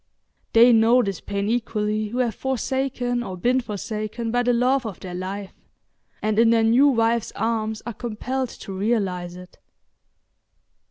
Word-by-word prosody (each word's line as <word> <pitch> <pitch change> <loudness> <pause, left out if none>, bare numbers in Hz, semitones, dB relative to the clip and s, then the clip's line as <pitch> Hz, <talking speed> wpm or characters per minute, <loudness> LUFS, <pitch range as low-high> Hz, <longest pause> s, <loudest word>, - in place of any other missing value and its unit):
They 235 +2 +7
know 230 +3 +5
this 195 -3 -4
pain 200 0 -3
equally 215 -2 -1
who 235 +4 -5
have 245 -3 +1
forsaken 260 0 -2
or 190 -6 -6
been 250 +8 +2
forsaken 215 +1 -4
by 245 +1 +2
the 245 0 +2
love 250 +3 +2
of 210 -7 -6
their 180 -1 -8
life, 190 +2 -5 0.7
and 215 0 +1
in 230 0 +5
their 230 -1 +4
new 240 +6 +5
wives' 230 -3 +1
arms 220 -1 -2
are 235 - -4
compelled 250 +4 -3 0.2
to 195 - -6
realise 190 -4 -1
it. 180 0 -13
225 Hz, 155 wpm, -23 LUFS, 210-245 Hz, 0.7 s, They